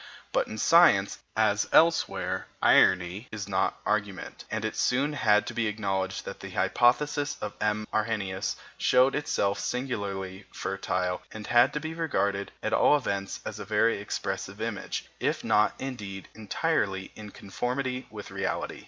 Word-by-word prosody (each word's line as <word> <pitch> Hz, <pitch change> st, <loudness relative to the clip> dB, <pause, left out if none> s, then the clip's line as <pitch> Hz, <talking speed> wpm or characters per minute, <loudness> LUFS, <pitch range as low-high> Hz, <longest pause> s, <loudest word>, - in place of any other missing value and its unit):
But -, -, +1 dB
in 110 Hz, -, -7 dB
science, 135 Hz, -, +5 dB, 0.2 s
as 105 Hz, -2 st, +2 dB
elsewhere, 165 Hz, +1 st, +3 dB
irony 95 Hz, +5 st, +4 dB
is 105 Hz, -3 st, -5 dB
not 95 Hz, -1 st, 0 dB
argument, 100 Hz, -2 st, -2 dB
and 110 Hz, 0 st, -2 dB
it 110 Hz, -, -2 dB
soon 140 Hz, +4 st, +1 dB
had 105 Hz, -6 st, +3 dB
to -, -, -5 dB
be 115 Hz, -2 st, 0 dB
acknowledged 95 Hz, -3 st, -2 dB
that -, -, -7 dB
the -, -, -8 dB
hypothesis 145 Hz, +4 st, +2 dB
of 105 Hz, -, -4 dB
M. 105 Hz, 0 st, 0 dB
Arrhenius 105 Hz, -3 st, -1 dB, 0.2 s
showed 130 Hz, +2 st, +4 dB
itself 100 Hz, -9 st, 0 dB
singularly 100 Hz, -7 st, -3 dB
fertile 90 Hz, -2 st, -2 dB
and 110 Hz, -1 st, -8 dB
had 120 Hz, 0 st, +5 dB
to 150 Hz, -, -1 dB
be 160 Hz, +1 st, -5 dB
regarded, 100 Hz, -12 st, -1 dB
at -, -, -1 dB
all 150 Hz, -, +5 dB
events, 100 Hz, -7 st, -3 dB
as -, -, -5 dB
a -, -, -4 dB
very 105 Hz, +1 st, +2 dB
expressive 100 Hz, 0 st, -4 dB
image, 110 Hz, -2 st, -4 dB
if -, -, -1 dB
not, 105 Hz, 0 st, +3 dB
indeed, 105 Hz, -8 st, -6 dB
entirely 105 Hz, -, -1 dB
in 105 Hz, -1 st, -9 dB
conformity 125 Hz, +6 st, -3 dB
with 105 Hz, -2 st, -9 dB
reality. 95 Hz, 0 st, -3 dB
105 Hz, 150 wpm, -28 LUFS, 100-125 Hz, 0.2 s, science